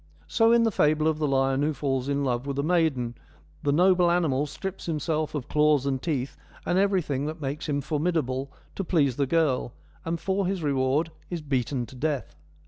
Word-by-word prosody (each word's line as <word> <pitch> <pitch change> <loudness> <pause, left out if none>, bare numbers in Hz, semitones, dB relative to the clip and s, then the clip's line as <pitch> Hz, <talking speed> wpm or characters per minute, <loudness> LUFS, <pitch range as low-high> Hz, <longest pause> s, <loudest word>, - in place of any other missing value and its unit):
So 225 0 +3
in 235 0 +5
the 225 - +2
fable 155 -3 +2
of 155 -1 0
the 150 - +1
lion 135 0 +2
who 150 +1 0
falls 135 -2 -1
in 140 0 0
love 125 0 -1
with 140 -1 -3
a 140 - 0
maiden, 155 -8 +1 0.5
the 145 - +1
noble 180 +3 +4
animal 150 -5 +1
strips 190 +6 -6
himself 155 -1 -1
of 140 -4 -4
claws 150 -2 +3
and 135 -2 -1
teeth, 140 -5 -2 0.3
and 180 - +2
everything 175 -8 +1
that 160 +2 -5
makes 145 +1 -4
him 145 -1 0
formidable, 145 -3 -1 0.2
to 195 - -3
please 145 -8 +2
the 140 -2 +1
girl, 135 -6 +1 0.3
and 165 +1 -2
for 190 +1 0
his 190 -3 -2
reward 140 +3 +1 0.2
is 170 -3 -4
beaten 130 -2 -1
to 125 - -13
death. 145 0 -2
150 Hz, 195 wpm, -26 LUFS, 135-165 Hz, 0.5 s, in